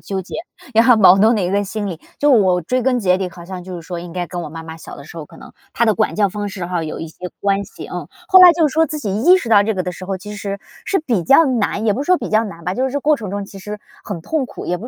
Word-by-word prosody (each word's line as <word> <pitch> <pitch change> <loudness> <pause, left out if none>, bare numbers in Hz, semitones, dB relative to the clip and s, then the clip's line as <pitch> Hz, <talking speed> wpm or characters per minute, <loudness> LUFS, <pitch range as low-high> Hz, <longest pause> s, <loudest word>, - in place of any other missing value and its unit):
纠 195 -1 -4
结， 185 - -10 0.4
也 225 - +6
很 240 -2 +5
矛 190 -2 +7
盾 220 +3 +4
的 - - 0
一 175 - 0
个 205 0 +2
心 205 +1 -4
理。 175 -4 -6 0.2
就 295 - +2
我 185 -6 +4
追 255 +9 -1
根 250 0 +1
结 185 -4 +2
底 190 -1 -3
好 170 0 -12
像 180 0 -7
就 185 -1 -7
是 170 - -8
说 175 -2 -5
应 170 -1 -9
该 180 -1 -3
跟 175 0 -5
我 155 - -6
妈 160 +1 -9
妈 160 0 -8
小 - - -11
的 - - -11
时 170 - -13
候， 155 - -6
可 - - -17
能 - - -13 0.2
她 235 - +1
的 220 - +3
管 215 -1 0
教 205 -2 +3
方 205 +1 -4
式 190 -3 -6
哈 175 -2 -2
有 155 - -5
一 165 - -5
些 180 +3 -8
关 200 0 +1
系。 - - -10
嗯， - - -6 0.2
后 375 -1 +7
来 355 -1 +10
就 325 -2 +3
说 320 +3 +2
自 305 0 -5
己 200 -7 -3
意 365 +3 +7
识 250 -11 -4
到 205 -2 +6
这 220 +2 0
个 185 -2 -3
的 180 - -3
时 185 - -9
候 190 0 -3
其 210 +2 -9
实， 200 -1 -5 0.3
是 390 - +1
比 235 - -1
较 275 - +6
难 230 -4 -1
也 210 - +4
不 265 +7 -2
是 - - -8
说 365 -1 +4
比 - - -5
较 215 +1 +3
难 170 -6 -8
吧， 180 +1 -2
就 255 - -1
是 265 - -1
这 285 - -1
过 300 +1 +2
程 210 -6 -7
中 200 0 -3
其 195 0 -12
实 210 +2 -7 0.2
很 195 -6 -6
痛 280 - -2
苦 - - -9
也 180 - 0
不 225 - -8
200 Hz, 355 characters per minute, -18 LUFS, 180-240 Hz, 0.4 s, 来